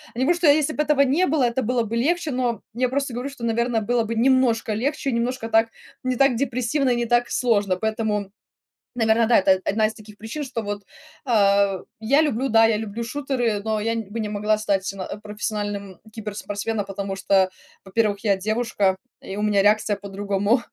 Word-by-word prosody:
Я -, -, -5 dB
не -, -, +2 dB
говорю, 345 Hz, +4 st, +3 dB
что 345 Hz, -2 st, +2 dB
если 300 Hz, +1 st, +4 dB
бы 300 Hz, -, +1 dB
этого 295 Hz, -1 st, +3 dB
не 280 Hz, +7 st, +3 dB
было, 290 Hz, -2 st, +1 dB
это 245 Hz, +2 st, +1 dB
было 245 Hz, +1 st, +1 dB
бы 225 Hz, +1 st, -3 dB
легче, 345 Hz, -2 st, 0 dB
но 250 Hz, -3 st, -1 dB
я 250 Hz, +3 st, +1 dB
просто 275 Hz, -1 st, -2 dB
говорю, 250 Hz, +4 st, -4 dB
что, 275 Hz, -4 st, -11 dB
наверно, 235 Hz, 0 st, 0 dB
было 235 Hz, +2 st, +1 dB
бы 230 Hz, +1 st, -3 dB
немножко 235 Hz, -2 st, +2 dB
легче, 275 Hz, +4 st, -1 dB
немножко 235 Hz, 0 st, -2 dB
так 225 Hz, 0 st, +4 dB, 0.4 s
не 255 Hz, 0 st, 0 dB
так 275 Hz, 0 st, +3 dB
депрессивно 255 Hz, +2 st, 0 dB
и -, -, +2 dB
не 240 Hz, 0 st, -1 dB
так 240 Hz, +1 st, +2 dB
сложно. 205 Hz, -6 st, +1 dB
Поэтому, 220 Hz, 0 st, -1 dB, 0.7 s
наверно, 225 Hz, -1 st, +3 dB
да, 235 Hz, -, +6 dB
это 190 Hz, -1 st, +3 dB
одна 215 Hz, +1 st, +2 dB
из 220 Hz, -, -8 dB
таких 210 Hz, -1 st, -14 dB
причин, 225 Hz, +8 st, -5 dB
что 240 Hz, -4 st, -4 dB
вот, 205 Hz, -1 st, -5 dB, 0.4 s
а 200 Hz, -4 st, +3 dB, 0.2 s
я 275 Hz, +8 st, +3 dB
люблю, 270 Hz, -3 st, 0 dB
да, 225 Hz, -1 st, +5 dB
я 220 Hz, -1 st, +1 dB
люблю 220 Hz, +1 st, -5 dB
шутеры, 250 Hz, -4 st, -1 dB
но 220 Hz, -1 st, -1 dB
я 225 Hz, +2 st, 0 dB
н 230 Hz, -, -2 dB
бы 225 Hz, +2 st, -4 dB
не 215 Hz, -, -2 dB
могла 210 Hz, +1 st, +1 dB
стать 200 Hz, -3 st, 0 dB
сама 195 Hz, -2 st, -4 dB, 0.2 s
профессиональным 205 Hz, -2 st, -4 dB, 0.2 s
киберспортсменом, 210 Hz, 0 st, -4 dB
потому 195 Hz, 0 st, -4 dB
что, 195 Hz, -1 st, +3 dB, 0.4 s
во-первых, 205 Hz, 0 st, 0 dB
я 200 Hz, -3 st, +3 dB
девушка 215 Hz, -2 st, 0 dB, 0.3 s
и 195 Hz, -, -5 dB
у 210 Hz, -, -3 dB
меня 205 Hz, -2 st, +3 dB
реакция 210 Hz, 0 st, +3 dB
по-другому. 200 Hz, +4 st, 0 dB
225 Hz, 200 wpm, -23 LUFS, 205-250 Hz, 0.7 s, да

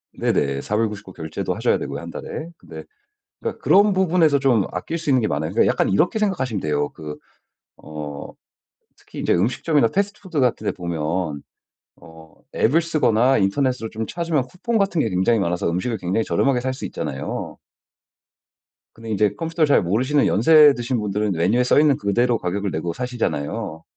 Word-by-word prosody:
네네. 70 Hz, 0 st, 0 dB
4 105 Hz, -, -3 dB
불 110 Hz, 0 st, +1 dB
99 100 Hz, -3 st, -9 dB
결제도 80 Hz, -2 st, -4 dB
하셔야 -, -, +1 dB
되고요. -, -, -5 dB
1 -, -, -8 dB
달에. 160 Hz, -, -6 dB
근데 -, -, -11 dB, 0.6 s
그러니까 -, -, -5 dB
그런 205 Hz, +1 st, +5 dB
부분에서 170 Hz, -5 st, +3 dB
좀 125 Hz, -7 st, +2 dB
아낄 125 Hz, -, -4 dB
수 170 Hz, -, -7 dB
있는 130 Hz, -3 st, +3 dB
게 110 Hz, -, 0 dB
많아요. 75 Hz, +2 st, -2 dB
그러니까 -, -, +3 dB
약간 -, -, +1 dB
이렇게 165 Hz, -, +2 dB
생각하시면 155 Hz, -, -1 dB
돼요. 75 Hz, -2 st, -1 dB
그 75 Hz, -1 st, -8 dB, 0.6 s
어 75 Hz, -2 st, -8 dB, 0.6 s
특히 -, -, -12 dB
이제 -, -, +1 dB
음식점이나 125 Hz, -, +2 dB
패스트푸드 200 Hz, -, -2 dB
같은 125 Hz, -4 st, +1 dB
데 -, -, +1 dB
보면 85 Hz, -3 st, -3 dB, 0.5 s
어 80 Hz, -1 st, -16 dB, 0.2 s
앱을 145 Hz, +9 st, +3 dB
쓰거나 135 Hz, -6 st, +2 dB
인터넷으로 115 Hz, +3 st, 0 dB
좀 110 Hz, 0 st, -4 dB
찾으면 165 Hz, -4 st, -1 dB
쿠폰 220 Hz, -, -2 dB
같은 195 Hz, -6 st, +1 dB
게 110 Hz, -, -1 dB
굉장히 95 Hz, +5 st, +2 dB
많아서 90 Hz, -3 st, -1 dB
음식을 105 Hz, +7 st, -2 dB
굉장히 95 Hz, +5 st, -1 dB
저렴하게 135 Hz, -3 st, +1 dB
살 130 Hz, +1 st, -1 dB
수 130 Hz, -, -6 dB
있잖아요. 65 Hz, -, -5 dB, 1.4 s
근데 115 Hz, 0 st, -10 dB
이제 105 Hz, 0 st, +2 dB
컴퓨터를 165 Hz, -1 st, 0 dB
잘 145 Hz, -, +4 dB
모르시는 130 Hz, +11 st, +1 dB
연세 150 Hz, +6 st, +6 dB
드신 120 Hz, +1 st, -2 dB
분들은 105 Hz, 0 st, -1 dB
메뉴에 95 Hz, +8 st, +2 dB
써있는 145 Hz, +2 st, +4 dB
그대로 120 Hz, +4 st, +1 dB
가격을 100 Hz, +1 st, -2 dB
내고 85 Hz, 0 st, -3 dB
사시잖아요. 85 Hz, -, -3 dB
115 Hz, 385 characters per minute, -22 LUFS, 90-145 Hz, 1.4 s, 연세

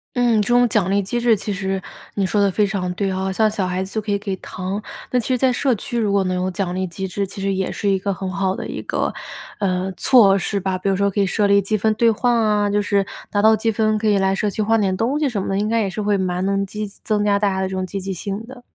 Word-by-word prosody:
嗯， 240 Hz, -3 st, +3 dB
这 205 Hz, -, -2 dB
种 245 Hz, 0 st, +4 dB
奖 205 Hz, -5 st, +1 dB
励 200 Hz, +1 st, +2 dB
机 240 Hz, +5 st, -2 dB
制 235 Hz, -2 st, +4 dB
其 205 Hz, +1 st, -3 dB
实 190 Hz, 0 st, -2 dB, 0.3 s
你 200 Hz, -, +1 dB
说 205 Hz, +2 st, +1 dB
得 200 Hz, -, +4 dB
非 205 Hz, +2 st, +2 dB
常 195 Hz, -3 st, -2 dB
对 195 Hz, 0 st, -1 dB
啊， 190 Hz, 0 st, -2 dB
像 215 Hz, +3 st, +2 dB
小 205 Hz, -3 st, -2 dB
孩 180 Hz, +1 st, -1 dB
子 190 Hz, -, -9 dB
就 220 Hz, -, -1 dB
可 210 Hz, 0 st, -4 dB
以 200 Hz, -, +2 dB
给 200 Hz, -1 st, -4 dB
糖。 185 Hz, +3 st, -5 dB, 0.3 s
那 250 Hz, -, +3 dB
其 230 Hz, -, -4 dB
实 255 Hz, -, +1 dB
在 255 Hz, 0 st, +2 dB
社 260 Hz, +1 st, +1 dB
区 235 Hz, +3 st, -4 dB
如 210 Hz, -3 st, +1 dB
果 200 Hz, -1 st, +2 dB
能 185 Hz, -1 st, -1 dB
有 180 Hz, +1 st, -1 dB
奖 180 Hz, -1 st, -2 dB
励 185 Hz, 0 st, -2 dB
机 190 Hz, +3 st, -5 dB
制， 195 Hz, +2 st, -2 dB
其 195 Hz, -, -10 dB
实 195 Hz, 0 st, 0 dB
也 190 Hz, -1 st, -1 dB
是 205 Hz, -, -3 dB
一 195 Hz, -1 st, +2 dB
个 200 Hz, +1 st, -1 dB
很 190 Hz, 0 st, -4 dB
好 190 Hz, 0 st, 0 dB
的 -, -, -5 dB
一 -, -, -5 dB
个， -, -, -1 dB, 0.5 s
嗯， 190 Hz, -1 st, -1 dB
措 210 Hz, -5 st, +5 dB
施 200 Hz, +1 st, -1 dB
吧。 190 Hz, -1 st, -2 dB
比 195 Hz, -, -1 dB
如 195 Hz, -, +2 dB
说 200 Hz, +1 st, +1 dB
可 205 Hz, -, -2 dB
以 195 Hz, -, +2 dB
设 205 Hz, +3 st, +1 dB
立 200 Hz, 0 st, +4 dB
积 215 Hz, +3 st, 0 dB
分 220 Hz, +2 st, +2 dB
兑 230 Hz, +2 st, +3 dB
换 240 Hz, +2 st, +1 dB
啊， 210 Hz, -2 st, +2 dB
就 205 Hz, 0 st, +2 dB
是 200 Hz, -1 st, +1 dB, 0.2 s
达 205 Hz, -, 0 dB
到 220 Hz, +1 st, +6 dB
积 225 Hz, +1 st, 0 dB
分 215 Hz, 0 st, +1 dB
可 220 Hz, -, -1 dB
以 205 Hz, -1 st, +4 dB
来 195 Hz, 0 st, +2 dB
社 205 Hz, +2 st, 0 dB
区 215 Hz, +2 st, -2 dB
换 225 Hz, +1 st, +2 dB
点 190 Hz, -2 st, 0 dB
东 255 Hz, +8 st, 0 dB
西 295 Hz, -3 st, +1 dB
什 225 Hz, -5 st, -2 dB
么 -, -, -4 dB
的， 195 Hz, 0 st, 0 dB
应 210 Hz, +1 st, 0 dB
该 230 Hz, +1 st, +2 dB
也 205 Hz, -, 0 dB
是 195 Hz, +3 st, -4 dB
会 205 Hz, -1 st, +1 dB
蛮 180 Hz, -1 st, -1 dB
能 195 Hz, 0 st, 0 dB
积 210 Hz, +2 st, -5 dB, 0.2 s
增 210 Hz, -1 st, 0 dB
加 205 Hz, -1 st, +3 dB
大 205 Hz, 0 st, +1 dB
家 190 Hz, -1 st, -1 dB
的 190 Hz, -, 0 dB
这 190 Hz, -, -4 dB
种 185 Hz, 0 st, -2 dB
积 195 Hz, +2 st, -5 dB
极 195 Hz, +1 st, -4 dB
性 195 Hz, +3 st, -4 dB
的。 255 Hz, -1 st, -12 dB
200 Hz, 330 characters per minute, -21 LUFS, 190-215 Hz, 0.5 s, 到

